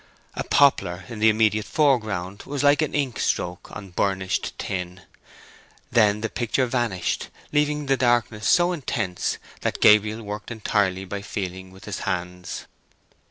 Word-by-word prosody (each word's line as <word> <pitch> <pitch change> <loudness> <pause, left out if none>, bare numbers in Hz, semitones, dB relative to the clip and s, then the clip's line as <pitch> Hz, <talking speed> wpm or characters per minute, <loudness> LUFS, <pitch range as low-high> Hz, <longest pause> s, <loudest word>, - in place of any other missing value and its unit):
A - - -3
poplar 140 -1 +3
in 115 -3 -7
the 110 +1 +6
immediate 110 -1 +2
foreground 110 - +1
was 145 0 -2
like 145 +1 +5
an 155 - -1
ink 135 -6 -1
stroke 90 0 -2
on 100 -3 -9
burnished 95 0 -1
tin. 90 0 -4 0.9
Then 105 -2 +4
the 110 - 0
picture 120 +3 0
vanished, 120 -7 -1 0.2
leaving 150 0 +1
the 135 -1 +2
darkness 120 -3 +1
so 175 0 +4
intense 115 - -2 0.2
that - - -2
Gabriel 105 +1 +5
worked 105 0 -6
entirely 100 -4 0
by 100 +2 -5
feeling 95 -2 -5
with 95 +2 -14
his 105 - -4
hands. 90 -2 -4
105 Hz, 145 wpm, -24 LUFS, 95-125 Hz, 0.9 s, the